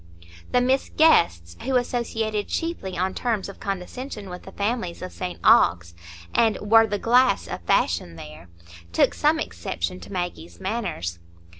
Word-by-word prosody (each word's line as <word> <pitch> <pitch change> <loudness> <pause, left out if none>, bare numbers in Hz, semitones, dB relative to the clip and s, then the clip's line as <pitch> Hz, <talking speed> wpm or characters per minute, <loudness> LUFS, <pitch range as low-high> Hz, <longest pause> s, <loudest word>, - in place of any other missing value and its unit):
The 250 - +3
Miss 260 +2 +1
Guests, 85 - +4
who 265 +1 -1
associated 225 -4 -1
chiefly 325 - -3
on 185 +2 0
terms 225 -5 -1
of 200 - -10
condescension 200 +2 -5
with 180 - -7
the 190 - -11
families 200 -5 -2
of 185 - -6
St 180 -1 -5
Ogg's, 85 - +4 0.4
and 225 -2 +3
were 225 +2 +5
the 205 -1 -1
glass 250 +5 +3
of 90 -1 -5
fashion 85 0 +1
there, 75 +2 -11 0.4
took 85 - +3
some - - +2
exception 85 0 -4
to - - -12
Maggie's 175 -2 -5
manners. 185 - -3
195 Hz, 150 wpm, -24 LUFS, -, 0.4 s, were